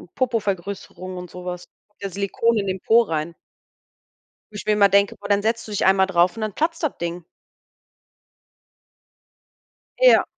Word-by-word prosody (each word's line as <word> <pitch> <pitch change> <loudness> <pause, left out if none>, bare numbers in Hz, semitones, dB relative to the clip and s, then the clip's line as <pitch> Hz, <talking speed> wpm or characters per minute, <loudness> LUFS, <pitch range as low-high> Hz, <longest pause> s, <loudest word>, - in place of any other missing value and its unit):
Popovergrößerungen 200 -5 -3
und 180 -1 -8
so 180 +1 -10
was. 180 0 -6 0.3
Das 200 -2 -6
Silikon 210 +3 0
in 200 -1 -1
den 190 -1 -3
Po 230 +1 +5
rein. 165 -2 -3 1.2
Wo - - -15
ich 210 - -6
mir 215 - +3
immer 200 -1 +5
denke: 200 +1 +3
„Boah, 200 - -9
dann 205 0 +3
setzt 225 +1 -1
du - - -8
dich 205 - 0
einmal 190 0 +5
drauf 175 0 +2
und 225 - -5
dann 215 -2 -2
platzt 330 +1 -1
das 305 - -1
Ding.“ 170 0 -4 2.7
Ja. - - +6
200 Hz, 160 wpm, -22 LUFS, 180-220 Hz, 2.7 s, Ja